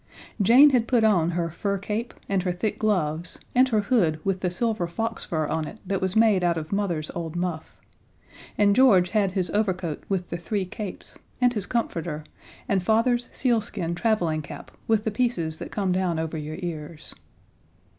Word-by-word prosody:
Jane 255 Hz, +9 st, +7 dB
had 240 Hz, -3 st, +2 dB
put 240 Hz, -3 st, +3 dB
on 180 Hz, -7 st, +4 dB
her 170 Hz, -1 st, -1 dB
fur 200 Hz, +4 st, -2 dB
cape 210 Hz, +4 st, -4 dB
and 195 Hz, -1 st, +1 dB
her 180 Hz, 0 st, -1 dB
thick 180 Hz, +4 st, -2 dB
gloves, 170 Hz, -6 st, -1 dB, 0.2 s
and 255 Hz, +1 st, +5 dB
her 220 Hz, -3 st, +2 dB
hood 200 Hz, -9 st, +2 dB
with 195 Hz, -1 st, 0 dB
the 185 Hz, -, 0 dB
silver 205 Hz, -1 st, -1 dB
fox 225 Hz, +6 st, -3 dB
fur 155 Hz, -2 st, -1 dB
on 155 Hz, +1 st, -2 dB
it -, -, -9 dB
that 195 Hz, 0 st, -1 dB
was 190 Hz, +1 st, -1 dB
made 220 Hz, -4 st, +4 dB
out 170 Hz, -1 st, +2 dB
of 155 Hz, -1 st, -5 dB
Mother's 175 Hz, -7 st, -1 dB
old 165 Hz, -1 st, -5 dB
muff; 175 Hz, -2 st, -4 dB, 0.8 s
and 200 Hz, -1 st, +4 dB
George 200 Hz, -9 st, +5 dB
had 200 Hz, -2 st, +1 dB
his 185 Hz, -2 st, -1 dB
overcoat 185 Hz, -7 st, -1 dB
with 190 Hz, -2 st, -1 dB
the 170 Hz, -, -2 dB
three 190 Hz, +3 st, -2 dB
capes, 195 Hz, +1 st, -8 dB, 0.2 s
and 250 Hz, -1 st, +3 dB
his 210 Hz, -4 st, -2 dB
comforter, 165 Hz, -9 st, -2 dB, 0.4 s
and 200 Hz, -6 st, +1 dB
Father's 230 Hz, +5 st, +2 dB
sealskin 215 Hz, -8 st, -1 dB
traveling 175 Hz, -6 st, +1 dB
cap 145 Hz, -, -10 dB, 0.2 s
with 220 Hz, -2 st, +2 dB
the 220 Hz, -, -1 dB
pieces 195 Hz, -9 st, -1 dB
that -, -, -6 dB
come 195 Hz, -3 st, -1 dB
down 180 Hz, -2 st, 0 dB
over 160 Hz, 0 st, -3 dB
your 155 Hz, 0 st, -5 dB
ears. 155 Hz, -2 st, -6 dB
190 Hz, 185 wpm, -25 LUFS, 170-220 Hz, 0.8 s, Jane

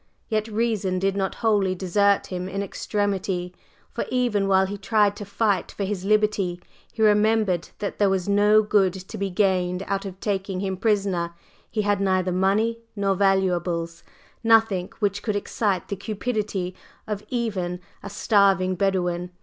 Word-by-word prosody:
Yet 215 Hz, -1 st, 0 dB
reason 215 Hz, -4 st, 0 dB
did 195 Hz, +1 st, 0 dB
not 195 Hz, -1 st, -1 dB
wholly 200 Hz, -4 st, +3 dB
desert 200 Hz, +2 st, +2 dB
him 180 Hz, +1 st, -3 dB
in 195 Hz, +1 st, -2 dB
extremity, 195 Hz, -3 st, -2 dB, 0.4 s
for -, -, -2 dB
even 240 Hz, -6 st, +1 dB
while 190 Hz, 0 st, +4 dB
he 200 Hz, +2 st, -4 dB
tried 205 Hz, +1 st, +2 dB
to 205 Hz, -, -6 dB
fight 200 Hz, -2 st, 0 dB
for 200 Hz, -, -4 dB
his 195 Hz, -1 st, -3 dB
liberty 210 Hz, -3 st, +1 dB, 0.3 s
he 220 Hz, -, -1 dB
remembered 210 Hz, -4 st, +3 dB
that 205 Hz, -, -4 dB
there 205 Hz, -1 st, +4 dB
was 190 Hz, -1 st, 0 dB
no 210 Hz, +1 st, +5 dB
good 200 Hz, -3 st, +3 dB
to 190 Hz, +3 st, -8 dB
be 200 Hz, 0 st, -1 dB
gained 180 Hz, -1 st, +1 dB
out 195 Hz, 0 st, -2 dB
of 190 Hz, -1 st, -7 dB
taking 195 Hz, -2 st, -2 dB
him 190 Hz, -1 st, -2 dB
prisoner; 190 Hz, -5 st, 0 dB, 0.3 s
he 215 Hz, -2 st, -1 dB
had 205 Hz, -1 st, +1 dB
neither 185 Hz, -1 st, +1 dB
money 200 Hz, +5 st, +1 dB, 0.2 s
nor 200 Hz, -1 st, +1 dB
valuables 180 Hz, -3 st, 0 dB, 0.4 s
nothing 225 Hz, -5 st, +3 dB
which 205 Hz, -1 st, -1 dB
could 210 Hz, -2 st, -2 dB
excite 205 Hz, -1 st, -1 dB
the 200 Hz, -, -3 dB
cupidity 205 Hz, -3 st, -3 dB, 0.3 s
of 210 Hz, -1 st, -4 dB
even 195 Hz, -8 st, -2 dB, 0.2 s
a -, -, -7 dB
starving 195 Hz, -3 st, +3 dB
Bedouin. 180 Hz, -2 st, 0 dB
195 Hz, 160 wpm, -24 LUFS, 185-210 Hz, 0.4 s, no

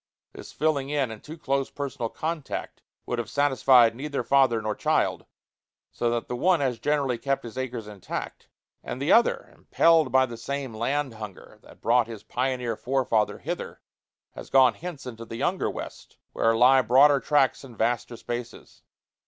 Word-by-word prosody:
This -, -, -11 dB
filling 145 Hz, -3 st, 0 dB
in 140 Hz, -5 st, 0 dB
and 110 Hz, -, -10 dB
too 155 Hz, +2 st, -9 dB
close 135 Hz, -3 st, -1 dB
personal 135 Hz, -5 st, -4 dB
contact 160 Hz, +1 st, -5 dB, 0.2 s
would 120 Hz, -, -3 dB
have 120 Hz, -, -4 dB
satisfied 130 Hz, -4 st, +4 dB
neither 140 Hz, +2 st, -3 dB
father 135 Hz, -4 st, +3 dB
nor 110 Hz, 0 st, -2 dB
child, -, -, 0 dB, 0.6 s
so 120 Hz, -, -1 dB
that 120 Hz, 0 st, -2 dB
the 125 Hz, -, -3 dB
one 175 Hz, +7 st, +2 dB
has 130 Hz, -5 st, -1 dB
generally 140 Hz, -5 st, 0 dB
kept 135 Hz, -1 st, -1 dB
his 115 Hz, -1 st, -9 dB
acres 125 Hz, -4 st, -4 dB
intact, 105 Hz, -3 st, -7 dB, 0.4 s
and 125 Hz, -, -6 dB
the 140 Hz, +4 st, 0 dB
other, 235 Hz, -, +3 dB
impelled 165 Hz, -5 st, +3 dB
by 130 Hz, +1 st, +4 dB
the 120 Hz, -2 st, -8 dB
same 135 Hz, +1 st, -4 dB
land 130 Hz, +4 st, -1 dB
hunger 105 Hz, -3 st, -10 dB
that -, -, -18 dB
brought 120 Hz, 0 st, +3 dB
his 115 Hz, -3 st, -9 dB
pioneer 125 Hz, -2 st, -2 dB
forefather 125 Hz, -3 st, 0 dB
hither, -, -, -6 dB, 0.5 s
has -, -, -10 dB
gone 130 Hz, -3 st, +5 dB
hence 170 Hz, -4 st, -8 dB
into 115 Hz, -2 st, -7 dB
the 115 Hz, -, -8 dB
younger 175 Hz, +9 st, 0 dB
West, -, -, -9 dB, 0.2 s
where 115 Hz, 0 st, +2 dB
lie 130 Hz, +2 st, +6 dB
broader 135 Hz, +4 st, +5 dB
tracts 140 Hz, -2 st, +1 dB
and 125 Hz, -5 st, -13 dB
vaster 120 Hz, +1 st, -1 dB
spaces. 120 Hz, +1 st, -7 dB
130 Hz, 170 wpm, -26 LUFS, 115-140 Hz, 0.6 s, lie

